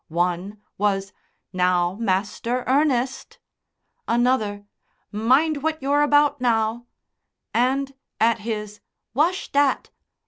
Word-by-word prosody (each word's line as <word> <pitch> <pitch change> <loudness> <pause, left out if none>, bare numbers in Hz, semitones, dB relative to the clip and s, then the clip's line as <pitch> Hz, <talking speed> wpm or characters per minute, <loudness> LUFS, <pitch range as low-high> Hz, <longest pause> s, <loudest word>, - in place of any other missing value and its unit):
One 180 +5 -2 0.2
was, 195 -1 0 0.4
"Now, 180 -1 +2
Master 210 +4 -1
Ernest!" 265 -2 0 0.7
Another: 230 -4 +1 0.5
"Mind 270 +8 +2
what 315 +1 -1
you're 280 +2 +1
about 290 -1 +3
now!" 230 0 0 0.7
And, 270 +3 +1 0.3
at 230 +1 +3
his 210 -1 -5 0.3
"Wash 335 +9 0
dat!" 285 -1 +1
235 Hz, 95 wpm, -23 LUFS, 205-275 Hz, 0.7 s, about